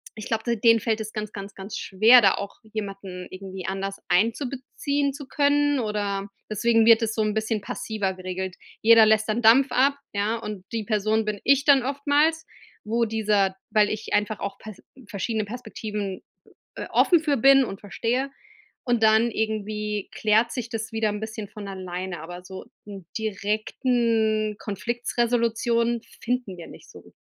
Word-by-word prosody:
ich 215 - -7
glaube 225 -1 -1
d 235 -1 +1
denen 230 +1 +5
fällt 220 0 0
es 215 0 -6
ganz, 215 -1 -5
ganz, 200 0 -8
ganz 195 +2 -7
schwer, 220 +6 +6
da 195 -3 +4
auch 200 - -6 0.2
jemanden 195 -3 -6
irgendwie 190 -1 -8
anders 195 +1 -4
einzubeziehen 270 +7 0
zu 285 -1 -9
können, 290 0 +2
oder 205 -3 -2 0.2
deswegen 225 +1 +3
wird 230 0 +7
das 220 -1 -1
so 220 - 0
'n 215 0 0
bisschen 220 0 -1
passiver 205 -1 -3
geregelt. 185 0 -5 0.3
Jeder 225 0 +7
lässt 215 0 +3
dann 220 +3 0
Dampf 240 +5 +6
ab, 275 +2 +3 0.2
ja, 210 +3 0
und 210 -4 -7
die 225 -1 -1
Person 215 +1 +1
bin 210 -1 -3
ich 275 +1 +4
dann 275 -3 +6
oftmals, 290 +4 +1 0.4
wo 230 +2 +1
dieser 210 -3 +1 0.2
weil 210 -1 +4
ich 215 0 -5
einfach 210 0 0
auch 200 0 -5
Pers 215 -3 -11 0.3
verschiedene 215 +2 -2
Perspektiven 210 -3 -5 0.5
äh, - - -5
offen 345 -3 +4
für 295 -3 +1
bin 270 +3 +6
und 195 -4 -7
verstehe 230 +7 -2 0.6
und 240 -3 +1
dann 220 +2 +4
irgendwie 210 -1 -3
klärt 220 +2 +2
sich 245 -2 -4
das 225 -1 -5
wieder 220 -1 +1
'n 205 0 -3
bisschen 220 -1 -6
von 205 -2 -9
alleine, 185 -2 -5
aber 175 +2 -9
so 190 0 -9 0.2
n' 200 -3 -10
direkten 220 +1 0
Konflikts-Resolutionen 235 +2 0 0.2
finden 245 -5 -2
wir 170 - -9
nicht - - -14
so. - - -15
220 Hz, 165 wpm, -25 LUFS, 200-235 Hz, 0.6 s, wird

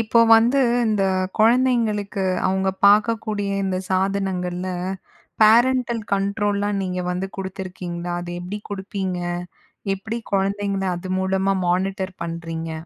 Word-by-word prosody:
இப்போ 230 +1 +3 0.2
வந்து, 240 +5 +3 0.3
இந்த 210 -3 +1 0.3
குழந்தைங்களுக்கு 220 -4 +2 0.2
அவுங்க 190 0 +1 0.2
பார்க்கக்கூடிய, 210 -1 +2
இந்த 185 -1 -1
சாதனங்கள்ல, 185 -1 -1 0.7
பேரன்டல் 235 +1 +4
கண்ட்ரோல்லாம் 200 0 0
நீங்க 180 -1 -2
வந்து 185 +2 -2
குடுத்துருக்கீங்களா? 180 -2 -5
அது 175 - -7
எப்படி 190 +4 -5
குடுப்பீங்க? 190 -2 -3 0.8
எப்படி 220 +4 -5
குழந்தைங்கள 195 0 0
அது 185 +1 -6
மூலமா 190 +1 +1
மானிட்டர் 190 +1 -1
பண்றீங்க? 165 -1 -5
195 Hz, 105 wpm, -22 LUFS, 185-210 Hz, 0.8 s, பேரன்டல்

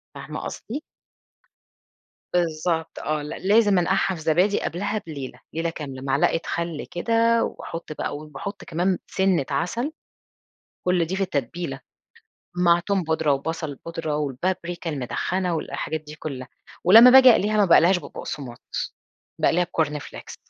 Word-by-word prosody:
فاهمة - - -6
قصدي؟ 275 +7 -6 1.5
بالضبط، 165 -1 0
آه، 155 0 -1
ل 150 - -7 0.2
لازم 205 -1 +5
أنقعها 190 +2 +1
في 160 - -9
زبادي 180 +6 +2
قبلها 205 +5 -2
بليلة، 135 -5 -7
ليلة 165 +1 -1
كاملة، 140 -5 -7
معلقة 135 +4 +2
خل 170 -2 -3
كده، 230 +5 +2
وأحط 165 -1 -6
بقى 145 - -3
وباحط 155 +7 -7
كمان 175 +3 0
سِنّة 190 -6 +1
عسل، 230 - -1 0.9
كل 180 -2 +2
دي 180 +4 -3
في 195 - 0
التتبيلة، 145 -2 -3 0.8
مع 175 -1 +4
توم 195 +1 0
بودرة، 160 -2 +1
وبصل 155 +2 -3
بودرة، 165 -3 -3
والبابريكا 170 +4 -2
المدخنة، 170 +6 -1
والحاجات 160 0 -3
دي 150 0 -11
كلها، 135 -5 -6 0.4
ولما 225 +8 +10
باجي 260 0 +9
أقليها 215 -1 +3
ما 210 - +5
باقليهاش 175 0 +5
ببقسماط 135 -7 -6 0.5
باقليها 180 +1 +3
بCorn 155 -3 -1
Flakes - - -10
170 Hz, 130 wpm, -24 LUFS, 150-190 Hz, 1.5 s, ولما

